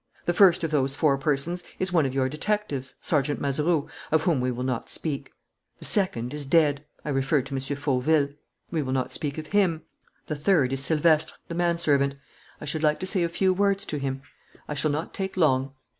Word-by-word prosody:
The 175 - +1
first 180 -2 +5
of 160 - -1
those 135 -2 +1
four 145 -2 +3
persons 150 +5 -1
is 185 -1 0
one 160 -5 +4
of 130 - -5
your 130 -1 +2
detectives, 150 -4 -3
Sergeant 145 -2 +1
Mazeroux, 150 +2 +1 0.2
of 160 0 +3
whom 160 -7 +2
we 125 - 0
will 125 0 -3
not 130 -2 -2
speak. 150 -4 -2 0.5
The - - -10
second 140 - 0
is 150 -1 -3
dead: 145 -1 +3 0.2
I - - -3
refer 135 0 +1
to 140 - -8
M. 135 - -1 0.2
Fauville. 140 +1 +1 0.4
We 165 -3 0
will 130 -2 -2
not 130 -1 -1
speak 145 -1 -3
of 155 - -5
him. 175 -4 +1 0.4
The 155 - -3
third 145 -4 +2
is 135 0 +3
Silvestre, 155 0 +3
the - - -4
manservant. 165 -5 +2 0.4
I - - -7
should 150 +1 -1
like 150 -1 +2
to - - -2
say 185 -1 +2
a 170 - +1
few 185 +2 +2
words 200 +1 +1
to 150 - -3
him. 135 -1 -3 0.4
I - - -3
shall 150 +1 +1
not 150 +3 -3
take 190 -1 -4
long." 135 -5 +2
150 Hz, 205 wpm, -26 LUFS, 135-170 Hz, 0.5 s, first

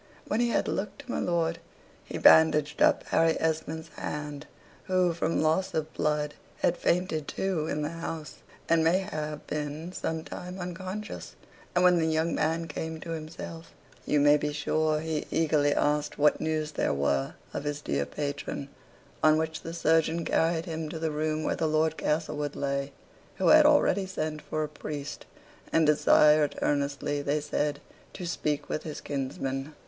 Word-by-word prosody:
When 215 - 0
he 240 0 +2
had - - +1
looked 210 +8 -3
to 250 - -6
my - - -1
lord, 165 -1 0 0.4
he - - -6
bandaged 150 -2 +5
up - - +5
Harry 165 0 +3
Esmond's 160 0 -2
hand 150 -1 -6 0.4
(who, 185 -2 +2
from 165 -1 0
loss 160 +5 +1
of 155 0 -2
blood, 150 -1 0 0.3
had 175 - +3
fainted 170 -5 0
too, 180 -5 -1
in 150 -1 -2
the 150 - -1
house, 165 -2 -6 0.3
and 165 -1 +4
may 165 +3 +4
have 155 -6 -4
been 150 +3 -4
some 160 -3 -3
time 180 +2 -7
unconscious); 185 +4 -6 0.4
and 180 - +4
when 180 -1 +6
the 160 - +1
young 160 +1 +1
man 165 +2 0
came 160 +1 -5
to 165 - -6
himself, 165 +1 -7 0.3
you 150 - +2
may 145 +1 +6
be 150 0 -2
sure 155 +1 0
he 160 -1 -3
eagerly 150 -3 +2
asked 150 0 +1
what 150 +1 +3
news 155 -1 -1
there - - 0
were 70 -1 0 0.2
of - - -3
his 145 0 -2
dear 70 - -1
patron; 140 - -4 0.5
on 155 0 +5
which 160 0 -2
the 165 - -6
surgeon 165 0 +2
carried 165 0 +1
him 160 -2 -4
to 160 - -5
the 160 0 -1
room 155 +1 -1
where - - 0
the 160 - 0
Lord 155 +1 +2
Castlewood 150 -2 -1
lay; 140 0 -2 0.4
who - - +2
had - - +8
already 195 0 +3
sent 155 -5 -3
for 155 0 -2
a - - -2
priest; 145 -1 -7 0.4
and 160 - +4
desired 150 0 +5
earnestly, 145 0 0
they 145 +2 0
said, 145 -1 -1 0.3
to 180 - -6
speak 150 -4 -2
with - - -2
his 155 -2 -6
kinsman. 135 +1 -4
155 Hz, 170 wpm, -28 LUFS, 150-165 Hz, 0.5 s, had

